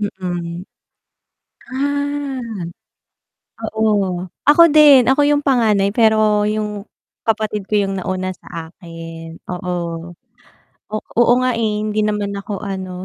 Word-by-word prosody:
Mm. 180 -3 -4 1.1
Ah. 285 0 -2 1.4
Oo, 200 -5 +1 0.2
ako 300 +4 +8
din 290 -5 +7
ako 270 +3 +4
yung 290 0 +3
panganay 220 -7 +2
pero 215 -2 +4
yung 210 -1 -3 0.4
kapatid 215 -2 -1
ko - - -6
yung 195 -1 -1
nauna 185 0 -3
sa 165 -1 -9
akin, 165 -1 -10
oo. 175 -2 -4 0.8
O - - 0 0.2
oo 240 +1 +5
nga, 255 -1 +1
eh, 220 -2 0
hindi 215 0 -1
naman 210 -1 -1
ako 200 0 -5
ano 185 -2 -5
210 Hz, 115 wpm, -19 LUFS, 185-230 Hz, 1.4 s, ako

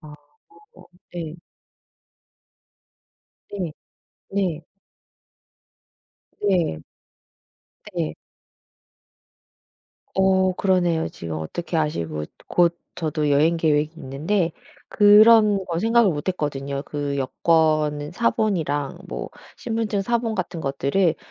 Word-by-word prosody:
아 155 -3 -12 1.0
네. 165 -2 -5 2.2
네. 180 -6 -4 0.6
네. 180 -5 -1 1.8
네. 175 - +1 1.2
네. 75 - -1 2.0
어 190 -1 +3
그러네요. 175 -4 +1
지금 80 -1 -6
어떻게 160 - -4
아시고 85 - -2 0.2
곧 175 -1 +2 0.2
저도 155 -2 -1
여행 155 +4 +3
계획이 155 -1 +1
있는데 165 +6 -1 0.4
그런 210 -1 +6
거 170 -1 -2
생각을 230 -1 +4
못 145 +5 -5
했거든요. 140 -5 -2
그 145 -1 -3
여권 155 +1 +1
사본이랑 170 - 0
뭐 - - -5 0.3
신분증 225 -3 -2
사본 230 0 -1
같은 180 -2 -3
것들을 140 +5 +1
165 Hz, 165 characters per minute, -23 LUFS, 145-195 Hz, 2.2 s, 그런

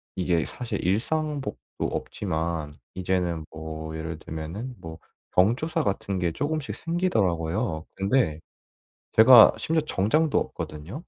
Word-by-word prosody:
이게 90 -3 +1
사실 125 -2 -5
일상복도 145 - 0 0.3
없지만 80 -5 -3 0.2
이제는 90 -3 -1
뭐 80 0 -6
예를 80 0 -5
들면은 85 +13 -6
뭐 80 -1 -9 0.3
경조사 120 - +2
같은 100 -1 -1
게 85 -2 0
조금씩 145 - -2
생기더라고요. 100 - 0
근데 95 - +1 0.7
제가 115 0 +9
심지어 160 0 +1
정장도 150 +9 +2
없거든요. 90 - -6
95 Hz, 270 characters per minute, -26 LUFS, 80-130 Hz, 0.7 s, 제가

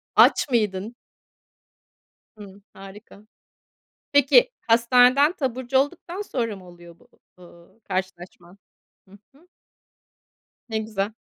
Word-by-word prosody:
Aç - - +4
mıydın? 215 -1 -2 1.4
Hımm, 200 -1 -14
harika. 200 +2 -14 0.9
Peki, 385 - +4 0.2
hastaneden 250 +6 +4
taburcu 260 -1 -2
olduktan 340 +7 -3
sonra 235 - -4
mı 185 -2 -15
oluyor 175 -1 -16
bu, - - -24 0.3
ııı, 170 +4 -19
karşılaşman? 185 -1 -7 0.5
Hı 200 - -16 0.2
hı. 325 +5 -24 1.2
Ne 220 - -2
güzel. 215 -1 -4
220 Hz, 95 wpm, -23 LUFS, 190-265 Hz, 1.4 s, Aç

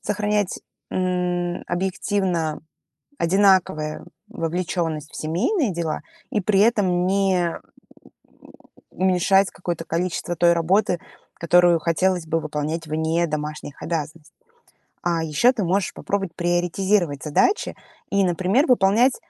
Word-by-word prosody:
сохранять, 210 -1 -1 0.3
м, 180 -1 -1
объективно 180 -3 -1 0.6
одинаковое 175 - +2 0.2
вовлеченность 165 -2 -3
в - - -9
семейные 210 - 0
дела 165 -2 -2 0.3
и 210 - 0
при 195 0 +1
этом 190 -5 +2
не, 190 -2 +2
м, 165 - -4 1.3
уменьшать 190 +1 +2
какое-то 175 -2 -5
количество 175 0 -2
той 170 0 +4
работы, 180 +2 +1 0.3
которую 175 0 +4
хотелось 175 +1 0
бы 165 +1 0
выполнять 155 +1 -3
вне 160 +2 0
домашних 150 -1 -5
обязанностей. 155 -1 -5 0.7
А 170 -1 0
еще 160 - +3
ты 225 -6 -3
можешь 185 +3 0
попробовать 195 -4 -3
приоритизировать 175 -2 0
задачи 370 - +1 0.3
и, 200 -1 +2
например, 185 - +2
выполнять 240 +1 +4
175 Hz, 110 wpm, -22 LUFS, 165-195 Hz, 1.3 s, той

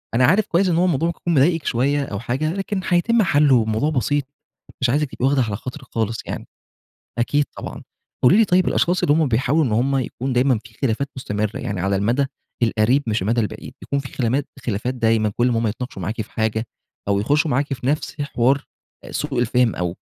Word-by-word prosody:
أنا 125 - +5
عارف 190 +9 +3
كويس 185 +3 +2
إن 170 - +2
هو 175 +2 +3
الموضوع 165 -2 +1
ممكن 170 - -4
يكون 175 - 0
مضايقِك 160 +3 +3
شوية 140 +4 +1
أو 100 -6 -5
حاجة، 135 - -1
لكن 195 0 -3
حيتم 215 +7 +2
حلُّه، 145 -6 +4
والموضوع 110 +4 +1
بسيط 145 0 0 0.6
مش 130 - +2
عايزِك 145 +2 +1
تبقي 125 - -2
واخدة 135 0 +3
على 110 -4 -1
خاطرِك 130 +5 -8
خالص 115 0 0
يعني، - - -6 0.7
أكيد 145 +5 +1
طبعًا، - - -7 0.4
قولي 165 - +6
لي 225 - +5
طيب 185 -1 +2
الأشخاص 175 +1 +1
اللي 145 - +4
هم 160 -2 +2
بيحاولوا 130 +6 +2
إن 115 - -1
هم 125 +6 +1
يكون 130 +1 -3
دايمًا 125 -2 +3
في 110 - -15
خلافات 135 +2 0
مستمرة، 105 -3 -2
يعني 100 -2 -3
على 100 +1 +1
المدى 120 +8 +1 0.4
القريب 115 +5 +2
مش 110 -2 0
المدى 115 +5 +1
البعيد، 105 - -5
بيكون 140 - -2
في 135 -1 -8
خلامات 130 +3 0 0.2
خلافات 120 +3 -1
دايمًا 115 -3 +2
كلّ 120 - +3
امّا 115 -2 +1
هم 115 - 0
يتناقشوا 115 -1 -5
معاكِ 105 +5 -3
في 105 - -9
حاجة، 110 +1 -1 0.4
أو 100 -1 +2
يخشوا 145 +8 +1
معاكِ 140 +2 0
في 125 0 -5
نفس 150 +2 -1
حوار 135 -1 +1 0.4
أ - - -10
سوء 145 -4 -2
الفهم 120 -1 +2
أو 90 0 -2
130 Hz, 210 wpm, -21 LUFS, 115-145 Hz, 0.7 s, قولي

